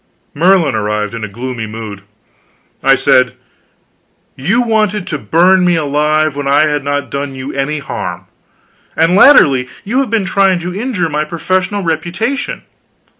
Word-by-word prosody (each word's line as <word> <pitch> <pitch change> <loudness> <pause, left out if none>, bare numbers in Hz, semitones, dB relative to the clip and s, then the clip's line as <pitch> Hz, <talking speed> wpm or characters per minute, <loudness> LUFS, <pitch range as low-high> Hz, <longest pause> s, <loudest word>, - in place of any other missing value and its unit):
Merlin 170 -2 +3
arrived 105 0 -2
in 115 -1 -6
a - - -3
gloomy 120 +2 -6
mood. 110 -2 -8 0.8
I - - +4
said: - - +2 1.0
"You 200 - 0
wanted 215 -4 0
to 150 - -4
burn 180 - +3
me 175 -1 +3
alive 150 0 0
when 145 -1 -4
I 140 +2 +4
had 150 -2 0
not 145 -2 -3
done 140 -1 -4
you 130 +2 -6
any 140 +3 -2
harm, 140 - -6 0.7
and 165 +3 +2
latterly 140 - +5
you 240 +6 -1
have 270 -4 0
been 220 -3 0
trying 190 -1 +2
to 180 +1 -5
injure 205 -4 -2
my 150 0 -1
professional 185 +5 -2
reputation. 175 - -3
155 Hz, 150 wpm, -14 LUFS, 135-190 Hz, 1.0 s, latterly